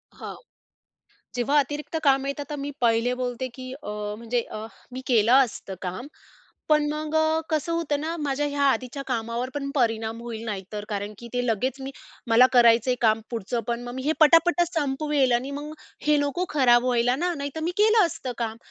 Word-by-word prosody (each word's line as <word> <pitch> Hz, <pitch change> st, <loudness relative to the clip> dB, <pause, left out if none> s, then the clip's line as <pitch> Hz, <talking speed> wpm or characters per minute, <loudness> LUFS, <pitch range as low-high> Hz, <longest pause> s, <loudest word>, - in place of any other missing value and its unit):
हां. -, -, -8 dB, 1.0 s
जेव्हा 255 Hz, +4 st, +2 dB
अतिरिक्त 295 Hz, +3 st, -4 dB
काम 270 Hz, -1 st, +3 dB
येतं 280 Hz, +1 st, -3 dB
तर 295 Hz, -, -3 dB
मी 285 Hz, 0 st, -4 dB
पहिले 235 Hz, +1 st, +2 dB
बोलते 250 Hz, 0 st, -3 dB
की 255 Hz, 0 st, -8 dB
अ, -, -, -8 dB, 0.3 s
म्हणजे 235 Hz, +2 st, -1 dB
अ, 215 Hz, +1 st, -6 dB, 0.3 s
मी 255 Hz, -, -5 dB
केलं 230 Hz, -2 st, +3 dB
असतं 210 Hz, -5 st, -8 dB
काम, 185 Hz, +7 st, -5 dB, 0.6 s
पण 300 Hz, -1 st, +4 dB
मग 305 Hz, 0 st, -4 dB, 0.4 s
कसं 315 Hz, +1 st, -1 dB
होतं 330 Hz, -4 st, -1 dB
ना 325 Hz, +2 st, -3 dB
माझ्या 290 Hz, -1 st, -1 dB
ह्या 285 Hz, 0 st, -2 dB
आधीच्या 260 Hz, +1 st, -2 dB
कामावर 235 Hz, 0 st, -2 dB
पण 275 Hz, -1 st, -3 dB
परिणाम 225 Hz, -3 st, 0 dB
होईल 230 Hz, -2 st, -6 dB
नाही 205 Hz, -4 st, -4 dB
तर 210 Hz, 0 st, -4 dB
कारण 205 Hz, 0 st, -3 dB
की 235 Hz, -, -10 dB
ते 245 Hz, 0 st, 0 dB
लगेच 250 Hz, +4 st, -1 dB
मी 265 Hz, +1 st, -5 dB, 0.4 s
मला 230 Hz, +2 st, +7 dB
करायचं 235 Hz, 0 st, +5 dB
आहे 250 Hz, -, +3 dB
काम 220 Hz, -1 st, +3 dB
पुढचं 235 Hz, +1 st, -2 dB
पण 235 Hz, 0 st, -2 dB
मग 245 Hz, 0 st, -7 dB
मी 260 Hz, -, -4 dB
हे 300 Hz, -, +1 dB
पटापट 330 Hz, +3 st, +5 dB
संपवेल 290 Hz, -3 st, +1 dB
आणि 245 Hz, +3 st, 0 dB
मग 295 Hz, +2 st, -6 dB, 0.3 s
हे 300 Hz, 0 st, +5 dB
नको 290 Hz, +5 st, 0 dB
खराब 245 Hz, -5 st, +4 dB
व्हायला 245 Hz, 0 st, +2 dB
ना 350 Hz, +5 st, -1 dB
नाहीतर 285 Hz, 0 st, -5 dB
मी 340 Hz, -, 0 dB
केलं 430 Hz, -1 st, +5 dB
असतं 275 Hz, -5 st, -4 dB
काम. 225 Hz, -2 st, -3 dB
255 Hz, 190 wpm, -25 LUFS, 235-290 Hz, 1.0 s, मला